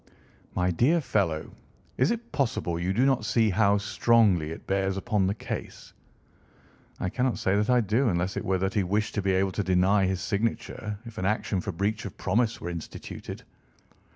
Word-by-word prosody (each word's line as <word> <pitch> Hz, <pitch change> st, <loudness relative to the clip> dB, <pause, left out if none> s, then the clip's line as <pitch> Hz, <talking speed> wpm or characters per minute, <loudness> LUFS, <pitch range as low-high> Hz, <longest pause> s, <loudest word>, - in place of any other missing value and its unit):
"My 90 Hz, 0 st, +1 dB
dear 130 Hz, -, +3 dB
fellow, 95 Hz, -, -1 dB, 0.4 s
is 130 Hz, -, +2 dB
it 235 Hz, 0 st, -3 dB
possible 100 Hz, -, -1 dB
you 90 Hz, +2 st, -1 dB
do 120 Hz, +7 st, +2 dB
not 135 Hz, -4 st, +2 dB
see 110 Hz, 0 st, +2 dB
how 100 Hz, +1 st, +3 dB
strongly 100 Hz, -5 st, +3 dB
it 80 Hz, -, -8 dB
bears 95 Hz, 0 st, 0 dB
upon 95 Hz, 0 st, +1 dB
the 100 Hz, -, 0 dB
case?" -, -, -7 dB, 1.1 s
"I -, -, -1 dB
cannot 125 Hz, +4 st, 0 dB
say 95 Hz, -, +1 dB
that 105 Hz, +2 st, +1 dB
I 125 Hz, -1 st, +5 dB
do 115 Hz, +5 st, +2 dB
unless 90 Hz, 0 st, -1 dB
it -, -, -3 dB
were 95 Hz, 0 st, +1 dB
that 95 Hz, +1 st, -1 dB
he 105 Hz, -, +2 dB
wished 105 Hz, +4 st, -1 dB
to 105 Hz, -, -1 dB
be 95 Hz, 0 st, +1 dB
able 95 Hz, +1 st, +2 dB
to 100 Hz, -, -2 dB
deny 95 Hz, +2 st, +3 dB
his 95 Hz, -1 st, -1 dB
signature 105 Hz, +1 st, -2 dB
if 115 Hz, -1 st, -8 dB
an 95 Hz, -, -2 dB
action 100 Hz, -2 st, 0 dB
for 100 Hz, -, -3 dB
breach 100 Hz, +5 st, -1 dB
of 100 Hz, -, -7 dB
promise 115 Hz, +5 st, 0 dB
were 85 Hz, -, -4 dB
instituted." 85 Hz, -2 st, -7 dB
100 Hz, 190 wpm, -27 LUFS, 95-115 Hz, 1.1 s, I